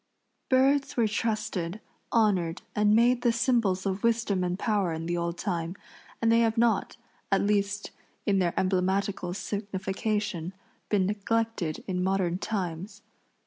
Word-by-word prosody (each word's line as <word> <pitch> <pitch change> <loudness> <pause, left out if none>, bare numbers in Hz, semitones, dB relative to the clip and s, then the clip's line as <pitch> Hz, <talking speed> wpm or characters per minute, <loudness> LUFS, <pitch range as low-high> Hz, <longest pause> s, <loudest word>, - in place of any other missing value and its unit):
Birds 275 +2 +3
were 230 -2 +4
trusted, 215 -4 -2 0.3
honored 190 -7 +2
and 210 0 +4
made 240 +2 +4
the 240 - +3
symbols 230 -6 +1
of 195 0 -1
wisdom 230 -5 +1
and 180 0 -1
power 200 -5 0
in 160 +1 -4
the 175 +1 -1
old 170 0 -2
time, 170 -2 -2 0.5
and 225 - +4
they 230 - +5
have 225 0 +2
not, 230 -3 +2 0.3
at 195 - +4
least 205 0 0 0.3
in 200 -2 +2
their 175 -2 +1
emblematical 190 0 0
signification, 200 -3 -3 0.4
been 200 -3 +2
neglected 210 -4 -1
in 180 -1 -1
modern 185 -2 0
times. 190 -2 -4
200 Hz, 140 wpm, -28 LUFS, 180-225 Hz, 0.5 s, they